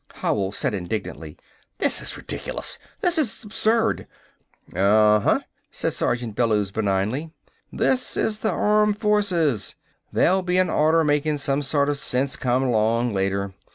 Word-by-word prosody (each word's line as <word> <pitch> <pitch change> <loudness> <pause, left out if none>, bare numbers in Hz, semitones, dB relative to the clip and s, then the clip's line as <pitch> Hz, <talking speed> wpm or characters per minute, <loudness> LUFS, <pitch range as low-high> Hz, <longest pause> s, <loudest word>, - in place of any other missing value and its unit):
Howell 95 -2 -1
said 105 - -2
indignantly: 100 +2 -5 0.4
"This - - +3
is - - -6
ridiculous! - - -5 0.2
This 355 -5 +2
is 245 -5 0
absurd!" 225 +2 0 0.7
"Uh - - -4
uh," 105 +1 +4 0.3
said - - -2
Sergeant 120 -3 -2
Bellews 105 -4 +1
benignly. 105 +9 -1 0.4
"This 255 -1 +1
is 215 -1 0
the 220 - 0
armed 210 +2 +2
forces. 190 - +1 0.4
There'll 190 +2 +3
be 180 0 0
an 185 0 +2
order 160 +2 +3
makin' 150 0 +1
some 140 0 0
sort 140 0 +1
of 145 -1 -1
sense 135 +1 0
come 125 +1 0
along 115 -1 +1
later. 100 0 -1
140 Hz, 140 wpm, -23 LUFS, -, 0.7 s, uh